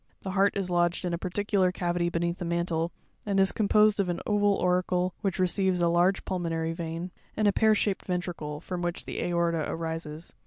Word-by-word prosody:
The 190 - -3
heart 200 +1 +2
is 185 -2 -2
lodged 175 +1 +1
in 175 - -1
a 170 - -2
particular 190 0 +1
cavity 175 -1 -1
beneath 170 +1 -1
the - - -3
mantle, 170 -1 -1 0.3
and 200 -2 0
is 195 0 +4
composed 215 0 +3
of 190 -2 +1
an 175 - -1
oval 205 -1 +3
auricle, 180 0 +1
which 195 -3 -1
receives 185 0 +1
a 170 - +3
large 175 +3 +2
pulmonary 165 -3 -2
vein, 165 +2 -5 0.3
and 215 - +3
a 200 - +4
pear 220 +1 +4
shaped 200 -1 -1
ventricle, 175 -5 -3
from 180 0 -5
which 175 0 -3
the - - -4
aorta 170 -2 0
arises. 160 -1 -5
180 Hz, 195 wpm, -28 LUFS, 170-195 Hz, 0.3 s, is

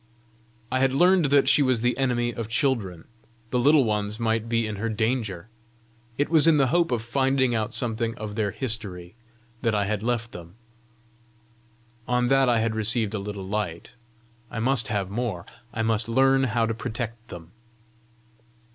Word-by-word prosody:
I 130 - +1
had 135 0 +2
learned 180 +2 +4
that 140 -1 +3
she 145 - +5
was 130 -4 +1
the 120 +1 +1
enemy 120 -2 0
of 115 -2 -5
children: 115 - -1 0.4
the 125 - +1
Little 145 +3 +5
Ones 105 -1 -2
might 115 0 -1
be 115 -1 +1
in 105 -1 -5
her 115 +3 -2
danger! 110 -4 -2 0.7
It 145 - +1
was 160 -1 +5
in 160 -2 +5
the 135 -3 +2
hope 170 -1 +2
of 115 -2 -1
finding 130 +1 +1
out 110 -2 -1
something 115 -2 0
of 105 -1 -6
their 105 -1 -1
history 100 -6 -4 0.5
that 115 -2 0
I 100 -1 +1
had 105 0 -2
left 120 0 -2
them; 85 +1 -11 1.5
on 125 0 +1
that 135 -1 +3
I 120 - +3
had 110 0 0
received 110 0 +2
a 110 - -2
little 100 -1 -6
light: 100 -5 -4 0.6
I - - -5
must 120 -1 +2
have 100 -3 -2
more; 105 -6 -3 0.3
I 115 - -3
must 110 0 0
learn 135 +2 +3
how 115 -1 0
to 115 - -2
protect 115 0 -6
them! 85 -5 -11
115 Hz, 175 wpm, -25 LUFS, 105-130 Hz, 1.5 s, she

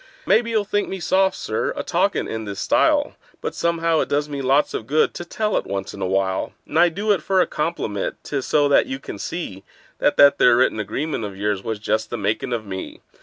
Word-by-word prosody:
Maybe 230 +1 +3
you'll 220 -3 +1
think 205 +1 -1
me 190 - -4
soft, 190 +3 +2
Sir, 110 - -2
a - - -3
talkin' - - 0
in 110 0 -4
this 100 -1 -6
style, - - +2 0.2
But - - -4
somehow 165 -1 +1
it - - -1
does 145 +1 0
me 140 -2 -4
lots 135 +3 +2
of 110 - -4
good 155 +2 +2
to - - -6
tell 210 +5 -1
it - - -3
once 95 0 -4
in 100 - -9
a 95 - 0
while; 95 0 0
And 160 - -1
I 175 0 +6
do 200 +6 -1
it 195 -6 +2
for 190 +3 +1
a - - +5
compliment—'tis 140 - -3
so 145 -1 +3
that 140 - +4
you 130 - -3
can 120 -6 -8
see 100 - -5 0.4
That - - +2
that 140 0 +6
there 120 -1 +6
written 125 -3 +2
agreement 115 +6 -3
of 100 -2 -6
yours 100 -1 -1
was 110 -1 -3
just 110 +1 -1
the 120 - -3
makin' 110 +5 -1
of 115 -3 -2
me. 95 -1 -7
135 Hz, 230 wpm, -22 LUFS, 105-170 Hz, 0.4 s, I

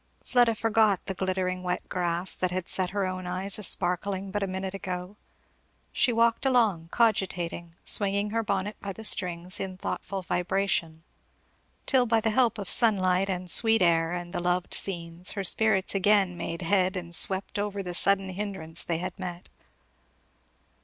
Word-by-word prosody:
Fleda 240 -2 +2
forgot 220 -3 +1
the 190 - -3
glittering 185 -1 -2
wet 180 0 -4
grass 175 0 -1
that 185 - -1
had 185 0 -4
set 185 -1 -1
her 200 0 -2
own 185 -1 -5
eyes 190 +3 +1
a - - -6
sparkling 190 +2 +2
but 205 +1 -3
a 195 - -1
minute 190 0 -5
ago; 185 0 -6 0.8
she 250 - +1
walked 230 0 +1
along, 220 -11 +1
cogitating, 180 -6 -1
swinging 200 0 +2
her 230 +1 0
bonnet 205 0 -3
by 200 -1 -5
the 220 - -11
strings 180 -3 +2
in 190 -1 -5
thoughtful 190 +1 -5
vibration, 180 -3 -1 0.8
till 255 -3 +2
by 225 0 +2
the 220 0 0
help 235 -1 +2
of 200 -3 -6
sunlight 195 -5 +2
and 180 -2 0
sweet 225 -3 +5
air, 165 -1 +2
and 175 0 -6
the - - -2
loved 180 0 -1
scenes, 170 -1 -1
her 200 - -4
spirits 195 0 +2
again 195 -2 +2
made 170 0 -6
head 185 +1 +1
and 175 -2 -5
swept 195 +5 +4
over 200 -1 -3
the 180 -1 -6
sudden 195 +2 +2
hindrance 185 -4 -1
they 170 - -2
had 180 +2 -6
met. 180 -2 -7
190 Hz, 165 wpm, -26 LUFS, 180-205 Hz, 0.8 s, sweet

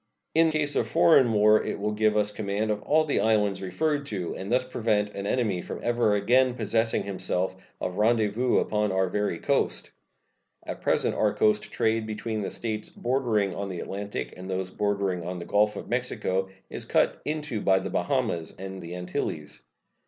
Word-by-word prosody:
In 165 0 +5
case 150 -2 0
of - - +1
foreign 160 -7 +5
war 105 0 +5
it - - -3
will 105 +1 -1
give 105 0 +2
us 105 0 +2
command 105 +1 -2
of 105 0 -2
all 155 +6 +3
the 145 - +1
islands 105 -3 +2
referred 145 +9 -1
to, 95 -7 -4
and 95 +3 -6
thus 125 +1 +3
prevent 110 -5 0
an 100 0 -5
enemy 105 -8 0
from - - -6
ever 120 -3 +2
again 125 +5 +3
possessing 115 0 0
himself 95 -1 -2 0.2
of 90 +1 -3
rendezvous 110 +2 +2
upon 105 -1 +1
our 95 0 +1
very 105 -3 -1
coast. - - 0 0.7
At - - -6
present - - +2
our - - +1
coast 105 -1 +2
trade 110 0 0
between 110 0 -3
the 100 - -2
States 110 -2 -3
bordering 120 -6 0
on 100 +2 -4
the 90 -2 -5
Atlantic 100 +3 -5
and 95 +1 -9
those 95 0 -2
bordering 100 -3 -1
on 90 +2 -4
the 85 - -6
Gulf 105 +1 +2
of - - -7
Mexico 95 -6 -1 0.2
is - - -5
cut - - +1
into 150 -7 -3
by 95 -1 +4
the - - -3
Bahamas 85 -2 -1
and 95 0 -7
the 85 +1 -7
Antilies. 90 -4 -4
105 Hz, 180 wpm, -27 LUFS, 95-115 Hz, 0.7 s, In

